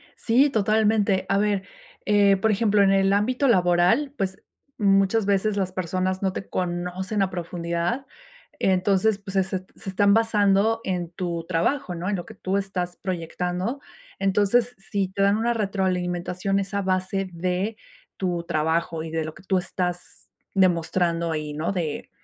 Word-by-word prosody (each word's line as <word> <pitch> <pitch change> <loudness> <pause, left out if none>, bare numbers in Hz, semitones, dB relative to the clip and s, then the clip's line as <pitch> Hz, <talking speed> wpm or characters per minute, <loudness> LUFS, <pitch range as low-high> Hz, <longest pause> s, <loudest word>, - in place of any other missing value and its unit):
Sí, 255 +5 +3
totalmente. 215 -3 +2
A 195 - +3
ver, 205 -1 +1 0.4
eh, 205 -1 +4
por 220 +3 +2
ejemplo, 210 -1 +3
en 195 -1 +5
el 195 0 +3
ámbito 250 +7 +1
laboral, 180 +7 +3
pues, 190 -2 -3 0.4
muchas 195 +1 +3
veces 200 +1 +1
las 190 -2 -1
personas 185 +1 -2
no 190 -1 0
te 195 - -6
conocen 180 +3 -2
a 190 - +2
profundidad. 175 +6 -3 0.5
Entonces, 195 +2 +2
pues 200 -1 -9
se 190 - +4
se 190 0 -3
t 185 - -26
se - - -7
están 200 +1 +3
basando 220 0 +3
en 175 -3 -3
tu 170 -2 -4
trabajo, 180 +6 0
¿no?, 175 +3 -3
en 205 - 0
lo 175 - -5
que - - -11
tú 190 +1 -1
estás 185 -3 -3
proyectando. 180 - -3 0.4
Entonces, 210 +5 +2
si 195 0 -2
te 195 +1 -3
dan 200 +1 +4
una 235 +2 +1
retroalimentación 185 -2 -1
es 195 +1 -5
a 200 - 0
base 190 0 -1
de 185 +5 -2 0.4
tu 175 -3 -1
trabajo 160 +1 -1
y 160 - -7
de 160 -1 -1
lo 155 - -6
que 195 - -15
tú 190 0 +1
estás 180 - -5 0.3
demostrando 170 -2 +2
ahí, 155 -1 -3
¿no? 155 +5 -2
De 170 -6 -3
190 Hz, 165 wpm, -24 LUFS, 180-205 Hz, 0.5 s, en